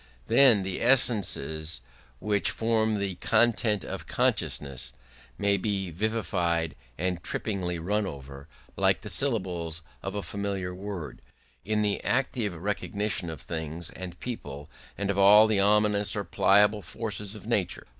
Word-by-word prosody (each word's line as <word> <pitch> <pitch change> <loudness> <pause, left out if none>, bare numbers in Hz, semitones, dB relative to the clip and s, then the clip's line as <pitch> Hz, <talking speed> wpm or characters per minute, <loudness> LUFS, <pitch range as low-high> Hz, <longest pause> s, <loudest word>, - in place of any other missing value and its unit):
Then 120 - +5
the 95 -1 -4
essences 95 - +1 0.4
which 105 - +1
form 110 -1 +1
the 100 -1 -2
"content 110 -3 +2
of - - -6
consciousness" 70 -3 -1 0.4
may 100 0 +2
be 95 -2 -2
vivified 85 -4 -1 0.2
and 90 0 -2
trippingly 90 -5 -2
run 100 +5 -1
over, 70 -1 -9 0.3
like - - +2
the - - -6
syllables 90 - 0 0.2
of 95 +1 -5
a 100 - -3
familiar 100 -3 -3
word, 90 -7 -7 0.4
in 105 +1 0
the 105 -1 -1
active 120 -6 0
recognition 100 0 -2
of 80 -4 -7
things 80 0 -5
and 90 -2 -8
people 75 - -7 0.3
and 100 0 0
of 100 - -2
all 105 +2 +8
the 110 -2 +2
ominous 105 0 +3
or 100 - -1
pliable 105 +2 +3
forces 105 -1 -5
of 105 - -11
nature. - - -1
100 Hz, 135 wpm, -28 LUFS, 85-105 Hz, 0.4 s, all